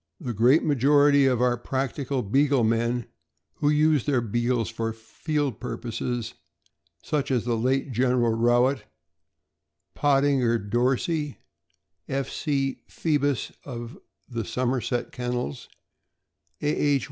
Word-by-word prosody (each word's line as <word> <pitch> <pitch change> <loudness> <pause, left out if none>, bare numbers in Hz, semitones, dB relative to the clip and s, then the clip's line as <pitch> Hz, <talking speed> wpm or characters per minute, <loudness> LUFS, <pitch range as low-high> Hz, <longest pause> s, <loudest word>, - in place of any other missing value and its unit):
The 120 - -4
great 125 +9 +4
majority 145 0 +4
of 125 -2 +2
our 125 -1 +2
practical 135 +1 -2
Beagle 135 +4 +2
men, 115 +1 +1 0.5
who 145 - +1
use 150 -2 +3
their 140 -4 +3
Beagles 120 +1 0
for 115 0 -3
field 135 +3 -3
pur - - -4
poses, 120 0 -4 0.7
such 145 -2 -1
as 125 -4 0
the 120 -1 +1
late 130 +4 0
General 125 -1 +2
Rowett, 120 +4 +2 1.1
Pottinger 135 -4 +2
Dorsey, 130 - -1 0.7
F. 135 0 -2
C. 135 -3 -1
Phoebus, 145 -5 0
of 120 -3 -7 0.3
the 120 -3 -4
Somerset 125 +3 -2
Kennels, 125 - -4 0.9
A. - - +1
H. 145 -2 +2
125 Hz, 115 wpm, -25 LUFS, 120-140 Hz, 1.1 s, great